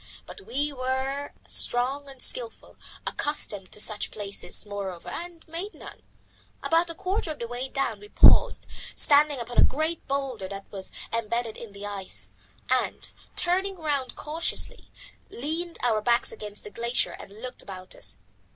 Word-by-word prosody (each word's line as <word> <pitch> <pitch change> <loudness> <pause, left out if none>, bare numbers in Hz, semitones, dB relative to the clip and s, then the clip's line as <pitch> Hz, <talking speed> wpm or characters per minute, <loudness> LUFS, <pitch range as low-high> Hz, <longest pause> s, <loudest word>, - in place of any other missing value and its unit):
But - - -9
we 290 +2 +1
were 265 +2 -1 0.2
strong 270 +4 +2
and 270 -1 -11
skilful, - - -3 0.3
accustomed 205 -10 -2
to - - +1
such 210 0 +2
places 200 -3 0
moreover, 195 -4 -5
and 345 -1 -6
made 345 +6 -4
none. - - -11 0.6
About 335 +1 +4
a 335 - -4
quarter 380 -1 -1
of 305 - -3
the 235 - -4
way 245 +2 -3
down 275 +1 0
we 415 - -12
paused, - - +7 0.3
standing 290 -1 +6
upon 240 0 -2
a - - +10
great 315 +3 +2
boulder 270 -8 -1
that 195 0 -6
was 195 -2 -3 0.2
embedded 230 0 0
in 230 -3 -8
the 200 +1 -7
ice, 185 - -4 0.4
and, 255 0 +1 0.2
turning 375 +2 +3
round 290 -6 -1
cautiously, 330 +10 -2 0.4
leaned 325 +6 -2
our 225 -3 +3
backs 235 +2 +3
against 210 -1 -7
the 210 - -8
glacier 235 +3 +1
and 200 +2 -10
looked 250 +2 -6
about 185 -2 -7
us. - - -1
255 Hz, 155 wpm, -28 LUFS, 210-310 Hz, 0.6 s, a